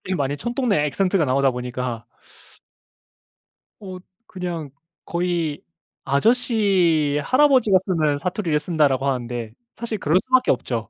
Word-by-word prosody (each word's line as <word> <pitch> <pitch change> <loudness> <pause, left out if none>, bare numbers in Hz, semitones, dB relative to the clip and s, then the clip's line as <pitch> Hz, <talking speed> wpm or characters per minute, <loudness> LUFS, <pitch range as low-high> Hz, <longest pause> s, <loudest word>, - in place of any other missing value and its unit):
좀 185 - 0
많이 140 -1 -1
촌동네 240 - 0
악센트 190 +6 0
가 160 - +2
나오다 135 0 +2
보니까 125 -1 -5 1.8
어. 190 -2 -8 0.3
그냥 175 -5 -5 0.4
거의 170 -3 -2 0.4
"아저씨, 180 - +2
할아버지가 255 -7 +4
쓰는 155 -6 0
사투리를 175 -3 -1
쓴다."라고 150 -4 +1
하는데 120 -4 -3 0.2
사실 230 -1 -4
그럴 160 -2 +1
수밖에 255 0 +3
없죠. 115 -3 -3
165 Hz, 280 characters per minute, -22 LUFS, 140-200 Hz, 1.8 s, 할아버지가